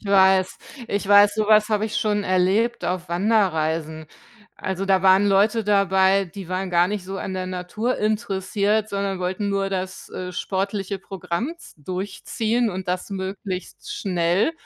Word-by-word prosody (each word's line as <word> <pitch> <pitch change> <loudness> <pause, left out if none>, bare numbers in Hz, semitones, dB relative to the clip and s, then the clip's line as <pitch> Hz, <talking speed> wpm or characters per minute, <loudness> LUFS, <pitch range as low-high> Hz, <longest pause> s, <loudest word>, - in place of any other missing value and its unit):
Ich 210 - -12
weiß, 190 -1 +4 0.3
ich 200 -1 -2
weiß, 205 0 +6
so 215 -1 0
was 215 0 +5
habe 215 -1 +1
ich 215 - -3
schon 210 -1 0
erlebt 195 +6 +1
auf 180 -1 -2
Wanderreisen. 160 -5 0 0.5
Also, 190 +1 -3
da 190 -1 +3
waren 190 +1 +5
Leute 210 +3 +3
dabei, 195 -1 +3
die 190 0 -10
waren 185 0 -2
gar 175 +1 +3
nicht 205 -3 -3
so 195 +1 -5
an 190 - -4
der 185 0 -3
Natur 185 +7 -2
interessiert, 210 0 0
sondern 200 -1 -2
wollten 185 +3 -2
nur 195 0 0
das, 185 0 -4
äh, 180 0 -6
sportliche 195 +1 -2
Programm 190 - -4
z - - -15
durchziehen 215 +5 -1
und 185 0 -6
das 180 +3 -2
möglichst 190 -1 -5
schnell, 180 - +1
195 Hz, 160 wpm, -23 LUFS, 185-205 Hz, 0.5 s, weiß